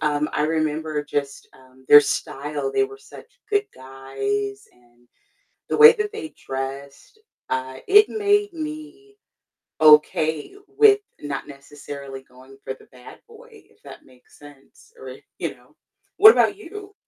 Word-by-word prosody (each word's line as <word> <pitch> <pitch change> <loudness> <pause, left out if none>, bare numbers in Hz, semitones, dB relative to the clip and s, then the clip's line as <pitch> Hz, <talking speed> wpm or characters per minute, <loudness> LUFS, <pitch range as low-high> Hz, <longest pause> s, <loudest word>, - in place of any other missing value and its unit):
Um, 150 0 -1
I 150 - 0
remember 155 -1 -2
just, 140 -1 -5
um, 130 0 -22
their 145 - +10
style. 145 0 -4
They 405 - +2
were 410 0 -11
such 475 +3 -16
good 410 0 +1
guys, 400 - -5
and 120 0 -29 0.6
the - - -1
way 450 +1 +9
that 425 -2 -4
they 375 -8 -8
dressed, 135 - -8 0.3
I 130 0 -4
it 415 +2 +6
made 410 -1 0
me 315 +6 -9 0.7
okay 155 - +3
with 410 0 +4 0.2
not 145 -2 -6
necessarily 140 -1 -11
going 130 +1 -19
for - - -5
the - - -19
bad 125 -1 -16
boy, 465 +1 -17
if 435 - -21
that - - -14
makes 125 -1 -23
sense, 145 - -19
or - - -10 0.2
you - - -4
know? - - -26 0.4
What 435 +2 +10
about - - +2
you? 405 +1 -11
150 Hz, 145 wpm, -22 LUFS, -, 0.7 s, their